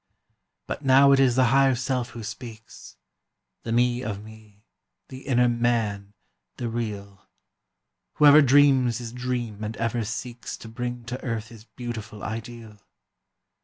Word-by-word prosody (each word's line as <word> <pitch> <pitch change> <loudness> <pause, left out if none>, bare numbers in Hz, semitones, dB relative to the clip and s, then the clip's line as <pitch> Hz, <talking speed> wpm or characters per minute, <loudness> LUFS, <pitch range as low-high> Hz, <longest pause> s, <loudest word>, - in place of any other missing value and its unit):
But - - -6
now 135 +1 +6
it 135 - +5
is 130 -3 +4
the 130 - +4
Higher 135 -1 +4
Self 125 -1 -2
who 115 -1 -9
speaks— 110 - -10 0.6
The 115 - -5
Me 120 +1 +2
of 105 -4 -5
me—the 110 - -16
inner 125 -2 +3
Man—the 115 -2 -3
real— 100 -4 -6 0.9
Whoever 150 0 +7
dreams 135 -3 +4
his 120 -2 -7
dream 120 -4 -4
and 110 +1 -5
ever 115 0 -1
seeks 120 +2 -6
To - - -11
bring 120 +1 -5
to 125 +2 -6
earth 115 -2 -4
his 115 -2 -14
beautiful 115 -4 -8
ideal. 115 -1 -7
120 Hz, 130 wpm, -25 LUFS, 110-125 Hz, 0.9 s, Whoever